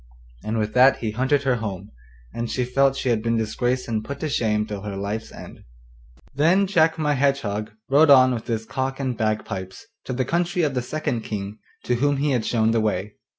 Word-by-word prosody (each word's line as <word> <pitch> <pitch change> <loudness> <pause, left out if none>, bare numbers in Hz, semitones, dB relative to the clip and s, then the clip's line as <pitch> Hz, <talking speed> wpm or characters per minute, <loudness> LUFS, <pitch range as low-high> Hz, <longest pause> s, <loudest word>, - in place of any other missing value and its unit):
And 110 +1 -2
with 105 -1 -1
that 130 +2 +6
he 110 -2 -3
hunted 130 +5 +1
her 130 -3 +1
home, 100 -3 -6 0.4
and 115 0 -3
she 125 - -1
felt 135 +2 +2
she 135 - -2
had 115 -2 +1
been 115 0 0
disgraced 120 +3 -1
and 110 -2 -2
put 140 +4 -7
to 155 - -2
shame 105 -5 0
till 105 -2 -6
her 105 -1 -5
life's 100 +3 -4
end. - - -11 0.7
Then 170 +8 +3
Jack 165 -4 +2
my 150 -2 +1
Hedgehog 130 -7 0 0.2
rode 145 +3 +5
on 130 -2 +7
with 115 -2 -5
his 115 -1 -2
cock 130 +3 -3
and 130 -3 -2
bagpipes 110 - -3 0.2
to 130 - -4
the 130 +1 -1
country 175 +3 0
of 145 -3 0
the 125 - -1
second 125 -2 -3
King 105 -1 -6 0.2
to 125 - 0
whom 145 +2 +1
he 145 +1 0
had 120 -4 0
shown 110 -1 +2
the 115 -1 +2
way. 105 -1 -2
125 Hz, 210 wpm, -23 LUFS, 110-140 Hz, 0.7 s, on